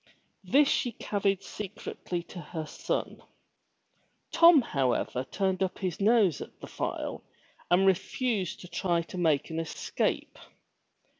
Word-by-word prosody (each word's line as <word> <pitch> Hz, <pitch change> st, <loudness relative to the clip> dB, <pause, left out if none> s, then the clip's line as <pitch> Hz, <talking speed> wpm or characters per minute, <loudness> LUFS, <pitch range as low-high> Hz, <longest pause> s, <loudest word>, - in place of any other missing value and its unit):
This 275 Hz, +10 st, +4 dB
she 245 Hz, -3 st, +1 dB
carried 200 Hz, -2 st, -1 dB
secretly 195 Hz, -4 st, -5 dB
to 175 Hz, -, -10 dB
her 160 Hz, 0 st, -5 dB
son. -, -, -3 dB, 1.1 s
Tom 335 Hz, -4 st, +8 dB
however 130 Hz, -, 0 dB
turned 190 Hz, +2 st, -1 dB
up 190 Hz, -1 st, 0 dB
his 185 Hz, -5 st, -3 dB
nose 205 Hz, -, +4 dB
at -, -, -10 dB
the -, -, -8 dB
file -, -, -4 dB, 0.5 s
and 180 Hz, +2 st, +4 dB
refused 195 Hz, +1 st, 0 dB
to 180 Hz, -, -9 dB
try 170 Hz, -1 st, 0 dB
to 180 Hz, +2 st, -7 dB
make 155 Hz, -3 st, +2 dB
an 160 Hz, -, -2 dB
escape. 165 Hz, -1 st, -2 dB
185 Hz, 130 wpm, -29 LUFS, 170-205 Hz, 1.1 s, Tom